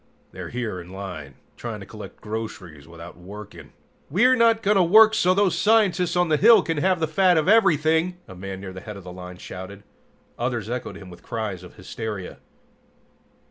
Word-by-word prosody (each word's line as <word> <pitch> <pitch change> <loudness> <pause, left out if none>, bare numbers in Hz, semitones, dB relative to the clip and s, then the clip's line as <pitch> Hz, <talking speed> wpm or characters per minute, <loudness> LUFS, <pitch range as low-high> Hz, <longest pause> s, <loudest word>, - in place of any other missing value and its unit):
They're - - -8
here 115 -7 -4
in 85 +1 -13
line, 90 -8 -8 0.2
trying - - -6
to - - -9
collect - - -11
groceries 100 -9 -7
without 85 +1 -11
working!" 100 +4 -11 0.4
"We're 245 - +4
not 230 -2 +3
going 205 0 +3
to - - +5
work 220 +5 +7
so 185 -4 +3
those 195 -4 +2
scientists 195 -3 +2
on 175 0 +2
the 155 -1 +2
hill 225 +7 +6
can 165 -2 -2
have 185 +3 +1
the 160 - 0
fat 180 +2 +3
of 155 - +1
everything!" 170 -4 +3
a 95 - -10
man 95 +1 -7
near 95 -1 -8
the 95 - -9
head 105 0 -8
of 100 - -11
the 90 0 -9
line 90 0 -9
shouted. 95 +3 -9 0.6
Others 120 -3 -2
echoed 125 0 -5
him 95 -2 -12
with 85 0 -13
cries 110 -6 -4
of 90 - -13
hysteria. 105 0 -7
120 Hz, 190 wpm, -23 LUFS, -, 0.6 s, work